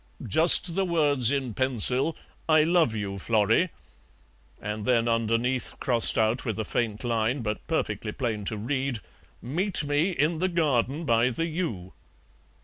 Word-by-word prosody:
"Just 165 Hz, -, +6 dB
the 195 Hz, -, +1 dB
words 145 Hz, -9 st, +2 dB
in 135 Hz, -5 st, -2 dB
pencil, 130 Hz, +4 st, +1 dB, 0.3 s
'I 155 Hz, -1 st, +5 dB
love 165 Hz, -8 st, +2 dB
you, 100 Hz, -2 st, -5 dB
Florrie,' 115 Hz, -, +1 dB, 0.9 s
and 105 Hz, +1 st, -5 dB
then 120 Hz, 0 st, +1 dB
underneath, 115 Hz, +2 st, -1 dB
crossed 120 Hz, -3 st, +3 dB
out 110 Hz, +3 st, +1 dB
with 110 Hz, -4 st, -4 dB
a 110 Hz, -, -2 dB
faint 110 Hz, -1 st, -3 dB
line, 120 Hz, +2 st, -1 dB
but 105 Hz, -1 st, -5 dB
perfectly 105 Hz, -9 st, -3 dB
plain 110 Hz, -4 st, -4 dB
to 110 Hz, -, -3 dB
read, 130 Hz, +3 st, -2 dB, 0.5 s
'Meet 175 Hz, -, -2 dB
me 145 Hz, +5 st, 0 dB
in 160 Hz, -1 st, -1 dB
the 185 Hz, +2 st, 0 dB
garden 150 Hz, -2 st, -1 dB
by 115 Hz, -1 st, +2 dB
the 165 Hz, +7 st, -2 dB
yew.'" 155 Hz, -, -5 dB
125 Hz, 145 wpm, -26 LUFS, 110-155 Hz, 0.9 s, Just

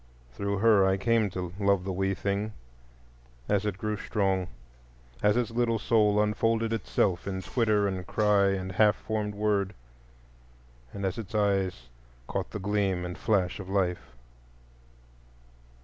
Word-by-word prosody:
Through 100 Hz, +8 st, -2 dB
her 105 Hz, -1 st, +5 dB
I 95 Hz, 0 st, +3 dB
came 110 Hz, +1 st, +2 dB
to 90 Hz, -1 st, -5 dB
love 100 Hz, -2 st, +2 dB
the 95 Hz, 0 st, -3 dB
wee 95 Hz, +1 st, 0 dB
thing, 100 Hz, +3 st, -2 dB, 0.9 s
as 105 Hz, 0 st, +1 dB
it 100 Hz, -3 st, -2 dB
grew 105 Hz, +2 st, -2 dB
strong; 95 Hz, -4 st, 0 dB, 0.7 s
as 105 Hz, +2 st, +3 dB
its 120 Hz, -1 st, 0 dB
little 115 Hz, -1 st, +1 dB
soul 105 Hz, -1 st, +3 dB
unfolded 115 Hz, +2 st, +1 dB
itself 100 Hz, -5 st, 0 dB
in 95 Hz, -1 st, -3 dB
twitter 105 Hz, -1 st, +1 dB
and 95 Hz, -2 st, -4 dB
cry 105 Hz, -2 st, +3 dB
and 95 Hz, -1 st, -1 dB
half 105 Hz, +2 st, +4 dB
formed 105 Hz, -2 st, -3 dB
word, 100 Hz, -2 st, 0 dB, 1.2 s
and 100 Hz, -1 st, -4 dB
as 95 Hz, +4 st, -2 dB
its 110 Hz, -1 st, -7 dB
eyes 95 Hz, -, 0 dB, 0.4 s
caught -, -, -3 dB
the -, -, -5 dB
gleam 100 Hz, -3 st, 0 dB
and 90 Hz, 0 st, -5 dB
flash 100 Hz, -4 st, 0 dB
of 95 Hz, -1 st, -8 dB
life. 90 Hz, -9 st, -1 dB
100 Hz, 145 wpm, -28 LUFS, 95-105 Hz, 1.2 s, her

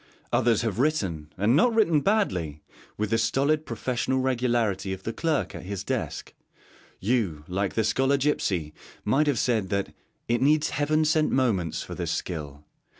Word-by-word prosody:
Others 115 Hz, -2 st, +3 dB
have 115 Hz, -2 st, -2 dB
written, 95 Hz, -, 0 dB
and 105 Hz, +6 st, +3 dB
not 225 Hz, +9 st, +4 dB
written 170 Hz, -9 st, +4 dB
badly, 90 Hz, -, 0 dB, 0.3 s
with 105 Hz, 0 st, -2 dB
the 115 Hz, -, +3 dB
stolid 145 Hz, +6 st, +1 dB
professional 125 Hz, +2 st, -1 dB
regularity 120 Hz, -7 st, 0 dB
of 95 Hz, 0 st, -8 dB
the 115 Hz, -, -3 dB
clerk 160 Hz, 0 st, -1 dB
at -, -, -7 dB
his 100 Hz, +1 st, -5 dB
desk; -, -, -3 dB, 0.7 s
you, 100 Hz, -9 st, 0 dB
like 95 Hz, +1 st, -2 dB
the 110 Hz, -, +2 dB
Scholar 135 Hz, +6 st, +2 dB
Gipsy, 95 Hz, -, 0 dB, 0.3 s
might 140 Hz, +8 st, +2 dB
have 140 Hz, -4 st, +2 dB
said 110 Hz, -5 st, +1 dB
that 100 Hz, -1 st, -2 dB, 0.3 s
'it 120 Hz, 0 st, +1 dB
needs 150 Hz, +3 st, +3 dB
heaven 155 Hz, +2 st, +1 dB
sent 155 Hz, 0 st, +2 dB
moments 100 Hz, -, 0 dB
for -, -, -8 dB
this 85 Hz, -2 st, -3 dB
skill.' 75 Hz, -4 st, -4 dB
115 Hz, 160 wpm, -26 LUFS, 95-140 Hz, 0.7 s, not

